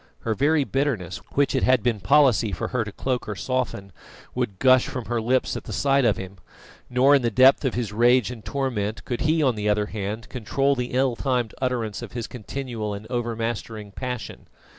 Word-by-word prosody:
Her 115 - -1
very 145 +5 +2
bitterness, 130 - -1 0.2
which 140 0 +2
it 130 - +1
had 130 -3 +3
been 120 -3 +1
policy 130 -5 +4
for 90 - -3
her 125 -3 0
to 105 - -7
cloak 125 +1 -3
or 105 - -3
soften, 125 -4 -3 0.4
would 95 - -2
gush 130 +3 +5
from 125 -4 -5
her 120 -1 -1
lips 125 +3 +1
at - - -6
the 120 - -7
sight 135 +4 +2
of 110 - +3
him; 95 +1 -8 0.5
nor, 130 +3 +4
in 140 - +5
the 120 - +1
depth 130 +6 +5
of 130 - 0
his 115 -4 -2
rage 120 +2 +4
and 115 -3 -9
torment, 115 -6 -2
could 120 - -3
he, 155 +1 +2
on 130 -3 +3
the 105 -1 -2
other 105 0 +2
hand, 105 +3 -5
control 130 +3 0
the 125 -2 -3
ill 130 -1 +2
timed 125 -3 -1
utterance 120 -5 -2
of - - -8
his 120 -2 -3
continual 115 -3 -5
and 100 +2 -9
overmastering 115 -3 -3
passion. 125 -2 -6
120 Hz, 205 wpm, -24 LUFS, 110-130 Hz, 0.5 s, gush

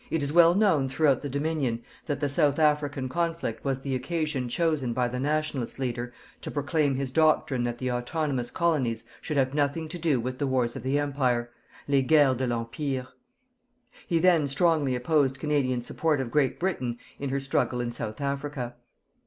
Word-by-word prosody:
It 165 -3 0
is 140 +1 -1
well 170 0 +7
known 185 -10 +3
throughout 135 -1 +2
the 145 - -4
Dominion 140 -4 -1 0.2
that 145 -3 -1
the 145 - 0
South 145 0 +2
African 150 -3 +1
conflict 165 -5 -2
was 135 -1 -1
the 135 0 -3
occasion 150 -2 -2
chosen 150 -4 0
by 125 +1 +1
the 125 +1 -4
"Nationalist" 150 -3 -1
leader 120 -2 -3 0.3
to - - -5
proclaim 145 -1 0
his 135 -1 -2
doctrine 155 -4 +2
that 120 0 -2
the 130 0 -2
autonomous 125 0 -1
colonies 130 -10 0 0.2
should 150 - -3
have 130 0 +2
nothing 145 +2 0
to 175 +2 -6
do 155 -6 +2
with 130 +2 -4
the 140 - 0
wars 125 -3 0
of - - -5
the 130 +4 0
Empire 130 -5 0 0.4
LES 140 -1 +3
GUERRES 145 -4 +5
DE 130 0 -1
L'EMPIRE. 125 +3 -2 1.0
He 170 - +2
then 165 -3 +4
strongly 145 -2 +2
opposed 135 +1 +1
Canadian 135 -5 0
support 155 +3 0
of 125 -3 -3
Great 140 -2 +1
Britain 130 -10 -1 0.2
in 140 - -3
her 140 +1 0
struggle 135 -2 0
in 120 -1 -2
South 110 -2 -5
Africa. 140 -3 -3
140 Hz, 180 wpm, -27 LUFS, 125-155 Hz, 1.0 s, well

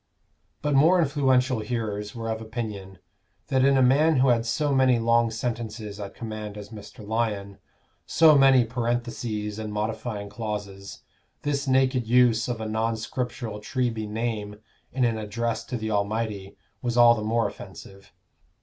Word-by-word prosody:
But 150 -1 +1
more 160 +7 +5
influential 130 -5 +2
hearers 105 -2 -4
were 115 -1 -5
of 110 0 -3
opinion, 110 -4 -6 0.5
that 130 -2 +2
in 135 0 +4
a 130 - +5
man 150 +5 +4
who 130 0 +4
had 115 -1 +2
so 145 +4 0
many 130 -2 +4
long 115 0 +3
sentences 110 -2 -5
at 100 -1 -7
command 110 -2 -6
as 105 -1 -9
Mr. 105 -1 -11
Lyon, 105 -3 -2 0.5
so 160 -2 +6
many 135 -3 +6
parentheses 115 -3 -3
and 110 -1 -5
modifying 110 0 -3
clauses, 100 -2 -6 0.4
this 140 -1 -1
naked 130 -2 +2
use 120 -1 +4
of 120 -2 -3
a 110 - -4
non 110 +1 -1
scriptural 115 -1 -4
Treby 115 -1 -2
name 105 -2 -3 0.4
in 130 -1 +1
an 115 -2 0
address 115 +2 -3
to 125 - -4
the 110 -1 -4
Almighty 100 -1 -2 0.2
was 120 -1 -2
all 120 0 +8
the 115 - -3
more 110 +1 +1
offensive. 100 0 -12
115 Hz, 155 wpm, -25 LUFS, 105-125 Hz, 0.5 s, all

